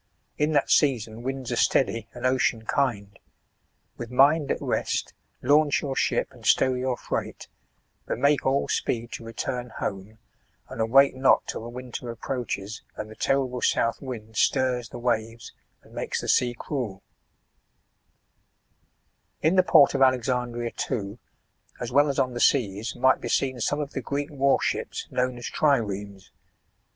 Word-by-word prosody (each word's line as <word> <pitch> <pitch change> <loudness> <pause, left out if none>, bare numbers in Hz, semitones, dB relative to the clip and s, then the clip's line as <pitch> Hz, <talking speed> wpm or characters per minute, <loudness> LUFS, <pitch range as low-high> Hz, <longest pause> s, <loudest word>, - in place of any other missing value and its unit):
In 150 +1 0
that 140 - +2
season 115 -6 +2
winds 130 0 -4
are - - 0
steady 115 -2 +1
and 120 +1 -5
ocean 130 -3 +1
kind: 105 -7 -1 0.8
with 120 - -6
mind 140 +4 +4
at - - 0
rest, - - -2 0.3
launch 145 +3 +3
your 135 -2 -3
ship - - 0
and - - -17
stow 130 - +4
your 125 0 -1
freight, - - -5 0.6
but - - -2
make 140 0 +2
all 135 +1 +1
speed 120 0 -2
to - - -7
return 120 +2 -4
home, 100 +2 -5 0.5
and 115 - -5
await 135 +5 +5
not 130 +1 +3
till - - -5
the 115 - -7
winter 125 0 -7
ap 115 - -10
proaches 110 -6 -4
and 105 0 -7
the - - -11
terrible 130 0 0
South 115 +1 +1
wind 110 -5 -7
stirs 125 -3 +1
the - - -8
waves 115 -1 -2 0.3
and - - -19
makes - - -3
the - - -6
sea 120 -1 +2
cruel/' 120 -9 -4 2.4
In 160 +4 +3
the 185 - +7
port 160 -5 +5
of 135 - -1
Alexandria 125 -2 +1
too, 105 -3 -4 0.6
as 120 0 -4
well 145 +3 +4
as 140 - -2
on 130 -1 +1
the 120 - -4
seas, 115 -5 +1
might 130 +1 +3
be - - -4
seen 130 -2 0
some 145 +6 0
of 145 -1 -4
the 135 - -3
Greek 140 +4 -3
warships 140 -1 0
known 125 0 -1
as 120 - -8
triremes. 100 -9 -1
125 Hz, 160 wpm, -26 LUFS, 115-135 Hz, 2.4 s, the